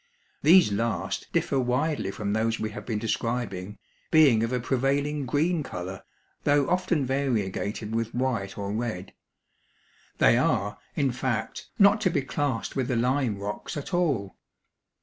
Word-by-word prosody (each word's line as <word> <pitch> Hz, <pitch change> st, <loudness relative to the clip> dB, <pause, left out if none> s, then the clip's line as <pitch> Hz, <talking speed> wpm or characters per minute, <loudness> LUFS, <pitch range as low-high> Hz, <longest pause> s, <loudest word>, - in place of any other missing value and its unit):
These 175 Hz, -, +6 dB
last 115 Hz, +3 st, -2 dB
differ 135 Hz, -, +1 dB
widely 130 Hz, -1 st, 0 dB
from 100 Hz, +1 st, -3 dB
those 110 Hz, +1 st, 0 dB
we 110 Hz, -, -2 dB
have 105 Hz, 0 st, -9 dB
been 110 Hz, -3 st, -1 dB
describing, 105 Hz, -3 st, -2 dB, 0.3 s
being 145 Hz, -8 st, +6 dB
of 115 Hz, +1 st, -1 dB
a 125 Hz, -, 0 dB
prevailing 140 Hz, +3 st, 0 dB
green 160 Hz, +4 st, +1 dB
color, 95 Hz, -7 st, -6 dB, 0.4 s
though 145 Hz, -1 st, +3 dB
often 180 Hz, -5 st, +1 dB
variegated 110 Hz, -5 st, -1 dB
with 115 Hz, 0 st, -2 dB
white 120 Hz, -7 st, -1 dB
or 100 Hz, -1 st, -3 dB
red. 110 Hz, -5 st, -4 dB, 1.0 s
They -, -, +5 dB
are, 100 Hz, +1 st, 0 dB, 0.2 s
in 140 Hz, -3 st, +1 dB
fact, 120 Hz, -1 st, -3 dB
not 200 Hz, +2 st, +5 dB
to 190 Hz, -, +3 dB
be 145 Hz, -5 st, 0 dB
classed 135 Hz, -3 st, -2 dB
with 130 Hz, -3 st, 0 dB
the 125 Hz, -, 0 dB
lime 125 Hz, -2 st, +1 dB
rocks 100 Hz, +8 st, -5 dB
at 145 Hz, +6 st, -6 dB
all. 140 Hz, -, 0 dB
125 Hz, 150 wpm, -27 LUFS, 105-145 Hz, 1.0 s, These